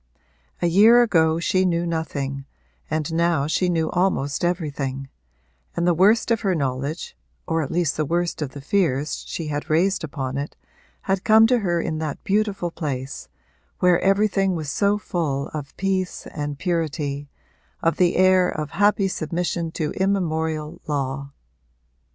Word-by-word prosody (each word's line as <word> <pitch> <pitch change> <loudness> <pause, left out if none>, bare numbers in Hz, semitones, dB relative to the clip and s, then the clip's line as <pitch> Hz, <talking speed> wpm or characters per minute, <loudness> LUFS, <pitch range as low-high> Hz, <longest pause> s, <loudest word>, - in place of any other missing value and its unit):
A - - +4
year 215 +8 +6
ago 160 -7 +2
she 185 +2 +1
knew 175 -2 +1
nothing, 140 -5 -3 0.4
and 155 +1 -2
now 165 -3 +2
she 180 +4 +1
knew 165 -2 0
almost 170 -6 0
everything; 140 -6 -2 0.7
and 170 - 0
the 175 - +4
worst 210 +7 +3
of 225 - +2
her 190 -3 +1
knowledge 140 - -3 0.3
(or 165 0 +1
at 145 - -3
least 170 -3 0
the 155 - +1
worst 170 +2 -1
of 140 -3 -3
the 140 - -8
fears 150 -3 0
she 160 -3 -4
had 145 0 -4
raised 175 +5 +2
upon 135 -3 -4
it) 145 - -5 0.5
had 190 0 -1
come 220 +1 +6
to 245 +1 +3
her 175 -5 0
in 155 -1 -2
that 155 -3 -4
beautiful 200 -4 0
place, 135 -5 -5 0.5
where 180 -1 +4
everything 195 -1 +2
was 155 -3 -3
so 200 +3 +2
full 155 -9 -2
of 145 -2 -7
peace 190 -1 -1
and 145 -2 -4
purity, 150 -5 -2 0.5
of 165 -1 +2
the 180 -2 +3
air 185 -1 +4
of 150 -1 -4
happy 205 +1 +3
submission 170 -1 -2
to 155 -3 -2
immemorial 160 -4 -1
law. 140 -1 -2
165 Hz, 155 wpm, -23 LUFS, 145-185 Hz, 0.7 s, year